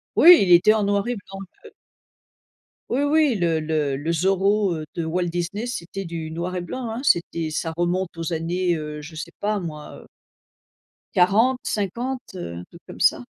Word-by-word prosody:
Oui, 350 +1 +9
il 180 - +1
était 180 +5 +6
en 215 -2 +1
noir 200 +1 +1
et 245 - -1
blanc, 195 0 -10 0.3
heu - - -12 1.2
Oui, 260 - 0
oui, 290 -2 +3
le 170 -4 +1
le 155 -3 -1
le 160 +4 -2
Zorro, 195 +2 +2
heu, 155 -1 -5
de 170 -2 -3
Walt 175 +3 -1
Disney, 175 +6 -3
c'était 195 -5 -5
du 165 -1 -5
noir 175 +3 -4
et 180 - -2
blanc, 245 +7 -5
hein, 230 - -4
c'était 170 - +1
ça 160 +1 -3
remonte 175 +1 -1
aux 165 0 -4
années, 175 +2 0
heu, 150 -1 -6
je 155 +2 -11
sais 155 - -6
pas 210 0 0
moi, 155 -4 -8
heu - - -18 1.1
40-50, 230 +3 0
heu, 85 - -6
un 85 - -7
truc - - -17
comme - - -10
ça. - - +3
180 Hz, 185 wpm, -23 LUFS, 165-210 Hz, 1.2 s, Oui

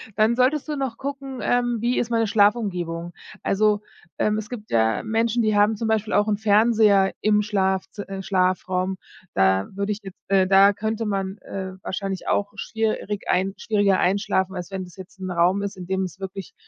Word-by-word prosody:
dann 220 +2 +3
solltest 265 +5 +2
du 300 - -2
noch 265 -4 -3
gucken, 275 -1 -6
ähm, 245 -1 +1
wie 240 +1 +1
ist 240 - -1
meine 230 -1 +1
Schlafumgebung? 190 -6 +1 0.3
Also, 210 +1 +2 0.4
ähm, 210 0 +1
es 215 0 -5
gibt 220 -4 -8
ja 110 -1 +2
Menschen, 225 +1 +1
die 215 -1 +2
haben 210 +2 +4
zum 225 +2 -3
Beispiel 220 -1 0
auch 205 +1 +3
'n 210 -1 +1
Fernseher 210 -2 +4
im 210 0 +3
Schlafzi 195 -1 -1
äh, 195 -1 -6
Schlafraum. 185 0 0 0.4
Da 95 0 +2
würde 200 +1 -1
ich 210 - -3
jetzt 195 -2 -10
äh, 190 -1 +4
da 195 +1 +6
könnte 220 +2 -2
man, 195 -1 -2
äh, 190 -1 -6
wahrscheinlich 190 0 -4
auch 205 0 0
schwierig 215 -1 -3
ein 190 +2 +1
schwieriger 205 -3 +2
einschlafen, 190 0 +1
als 180 +1 -6
wenn 190 -1 -4
das 180 - -15
jetzt 190 0 -12
'n 185 -1 -4
Raum 180 +3 +2
ist, 200 - -4
in 180 - -7
dem 190 0 0
es 185 0 -7
wirklich, 195 -1 -7
200 Hz, 190 wpm, -23 LUFS, 190-220 Hz, 0.4 s, da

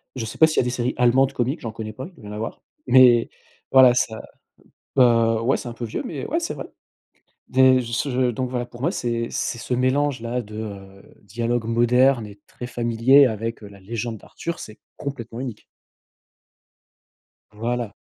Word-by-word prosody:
Je 115 - -3
sais 110 - -8
pas 160 - +8
s'il 155 - -3
y - - +6
a - - -1
des 125 - -1
séries 125 0 -2
allemandes 130 +2 +3
comiques. 130 +4 -1
J'en 115 - -5
connais 110 0 -7
pas. 130 - -7
Il 185 - -17
doit - - -13
y 105 - -8
en - - -7
avoir. 110 +2 -5 0.3
Mais 125 -2 +6 0.4
voilà 130 -2 +8
ça 110 -2 -1 0.8
heu, 115 -3 +4
ouais, 125 +4 +2
c'est - - -8
un 120 - -5
peu 120 - -8
vieux 110 - -4
mais 140 -6 -5
ouais, 330 - 0
c'est 335 - -3
vrai. - - -7 0.8
Des 130 0 +5
ce 120 +4 -2
heu, - - -3 0.2
je 120 - +1
donc 130 +2 -3
voilà, 120 -1 -2
pour 120 0 -13
moi, 165 - +1
c'est 115 - -2
c'est - - -2
ce 125 - -4
mélange-là, 130 -2 0
de, 105 +1 -11
heu, 100 -3 -9
dialogue 115 +3 -2
moderne 120 +1 +3
et 100 0 -14
très 120 - -8
familier 120 +3 +4
avec, 115 -1 -3
heu, 105 - -8
la 100 -1 -14
légende 115 +3 -5
d'Arthur. 170 +10 -7
C'est 110 - -10 0.2
complètement 120 -5 -6
unique. 125 -5 -6 1.9
Voilà. 115 0 -3
120 Hz, 195 wpm, -23 LUFS, 115-130 Hz, 1.9 s, pas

